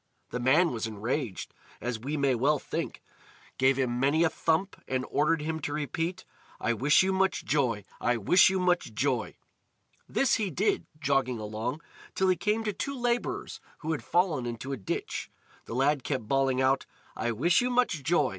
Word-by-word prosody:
The 125 - -2
man 150 +8 +4
was 115 -2 -2
enraged, 110 0 -3 0.3
as 120 0 -3
we 140 +6 -3
may 140 -2 +2
well 140 +5 +2
think, - - -5 0.6
gave 130 0 +4
him 125 -2 0
many 145 +5 +3
a 165 - +3
thump, 165 +4 0
and 130 -1 -1
ordered 150 +1 +2
him 160 +1 -2
to 145 -1 -4
repeat: 165 +5 -3 0.3
"I 120 - +1
wish 140 - +4
you 190 0 +1
much 190 0 +1
joy! 120 -9 +1
I 120 0 +1
wish 145 - +5
you 190 0 0
much 180 -1 +1
joy!" - - 0 0.7
This 270 - +2
he 210 -4 -1
did, 185 +6 0
jogging 135 -4 +1
along, 110 +7 -4 0.3
till 190 0 +2
he 185 - +4
came 210 +4 0
to 210 -2 -1
two 275 +7 -4
labourers 240 0 -1 0.2
who 160 0 -2
had 145 -7 -2
fallen 170 -9 +1
into 120 +3 -5
a - - 0
ditch. 95 - -4 0.4
The 115 - -6
lad 135 +1 +2
kept 130 -7 -3
bawling 135 0 +2
out: 135 +1 +2 0.3
"I 120 +2 -1
wish 165 - +3
you 250 - 0
much 245 - +1
joy! 165 +5 +2
145 Hz, 185 wpm, -29 LUFS, 125-175 Hz, 0.7 s, wish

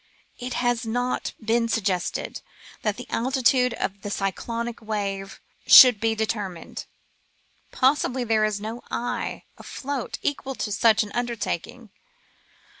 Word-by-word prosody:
It 250 0 -4
has 245 -1 0
not 245 +2 -2
been 230 +1 +1
suggested 190 -5 -1 0.4
that 210 -2 -1
the 245 - -7
altitude 250 0 +2
of 195 +1 -4
the 205 - -5
cyclonic 230 +4 -3
wave 200 -2 -4 0.3
should 250 -5 +10
be 225 0 +1
deter 215 -2 -1
mined. 170 -2 -9 0.8
Probably 260 -1 +1
there 220 -2 +2
is 215 -1 0
no 220 +3 -6
eye 245 - -3 0.2
afloat 280 -2 -5
equal 270 -2 -2
to 210 - -3
such 220 +1 +4
an 205 - -9
undertaking. 235 -1 -4
230 Hz, 125 wpm, -25 LUFS, 210-245 Hz, 0.8 s, should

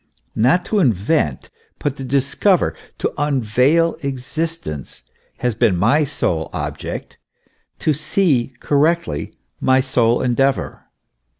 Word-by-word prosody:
Not 135 +11 +3
to 215 - 0
invent, 110 - +1 0.3
but 145 -2 -2
to 135 - -6
discover, 140 +8 +1 0.2
"to - - -2
unveil 145 +4 +2
existence," 135 - -4 0.3
has 125 -1 0
been 110 -4 +2
my 120 - +3
sole 80 - -1
object; - - -5 0.6
to 155 - +1
see 155 -4 +1
correctly, 145 - 0 0.2
my 130 0 +3
sole 125 -3 +2
endeavour. 135 +2 0
135 Hz, 105 wpm, -19 LUFS, 120-155 Hz, 0.6 s, Not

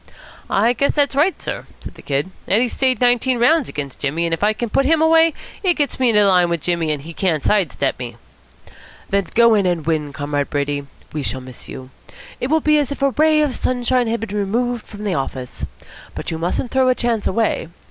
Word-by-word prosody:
"I 225 +5 +3
guess 280 +4 +1
that's 285 -2 +2
right, 320 +7 +2
sir," - - -5
said - - -10
the - - -14
Kid. 145 +6 -2 0.2
"Eddie 235 +5 +2
stayed 260 +1 +1
nineteen 245 0 +3
rounds 285 +4 +3
against 140 -3 -6
Jimmy, 155 +4 -1
and 165 - -1
if 165 - -2
I 210 - +4
can 225 +1 -4
put 275 - +3
him 320 +1 +4
away, 325 0 +4 0.3
it 360 -4 +2
gets 290 -4 -1
me 255 -2 +3
into 210 -2 +4
line 180 -3 +4
with 170 -2 -1
Jimmy, 170 -1 -1
and 145 -2 -3
he 165 +2 -9
can't 165 -5 0
side 200 -6 +2
step 135 -2 -2
me." 120 -2 -6 1.0
"Then 200 -1 +1
go 235 0 +6
in 200 -3 +3
and 170 -4 -1
win, 155 -3 -1
Comrade 145 0 -2
Brady. 145 0 -2 0.3
We 150 - -2
shall 130 -1 -3
miss 130 -1 -11
you. 130 0 -9 0.5
It 250 - -1
will 315 +3 +2
be 305 0 +4
as 285 -2 -1
if 280 - -4
a 275 - +3
ray 310 +2 +3
of 295 -4 +1
sunshine 250 -1 0
had 225 -1 -1
been 210 -2 -5
removed 235 +4 -1
from 210 -1 -9
the 200 -3 -1
office. 130 -4 -4 0.5
But - - -5
you 160 - -4
mustn't 180 +8 -2
throw 260 -1 +3
a 255 - +3
chance 235 -4 -1
away. 215 -4 0
210 Hz, 225 wpm, -20 LUFS, 160-255 Hz, 1.0 s, go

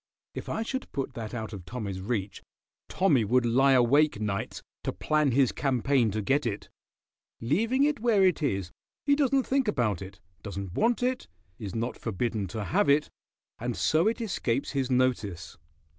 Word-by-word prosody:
If - - -6
I 220 - -1
should 260 +3 -4
put 135 - -3
that 115 0 -6
out 110 -1 -5
of 95 -3 -7
Tommy's 100 -3 -5
reach, 100 -1 -3 0.5
Tommy 150 -11 +3
would 120 +4 +2
lie 135 +4 +4
awake 130 +1 +4
nights 105 -2 -3 0.2
to - - -1
plan 150 -2 +1
his 130 0 +3
campaign 135 -3 +1
to 105 +1 -2
get 140 +4 +1
it. 105 -2 -5 0.7
Leaving 225 - +1
it 295 -3 +1
where 215 -4 +3
it 180 -4 +2
is 95 - -1 0.3
he 285 -1 +4
doesn't 275 -2 +2
think 270 -2 +1
about 115 - 0
it, 95 -1 -9 0.2
doesn't 100 -3 -6
want 235 - +1
it, 255 0 -1 0.3
is 100 -2 -6
not 115 +2 -2
forbidden 110 -1 -2
to 110 +4 -4
have 190 - +1
it, 145 +2 +3 0.5
and 120 0 -3
so 160 +5 +2
it 230 - 0
escapes 135 - -1
his 135 -3 -1
notice." 120 - -1
125 Hz, 175 wpm, -28 LUFS, 110-175 Hz, 0.7 s, lie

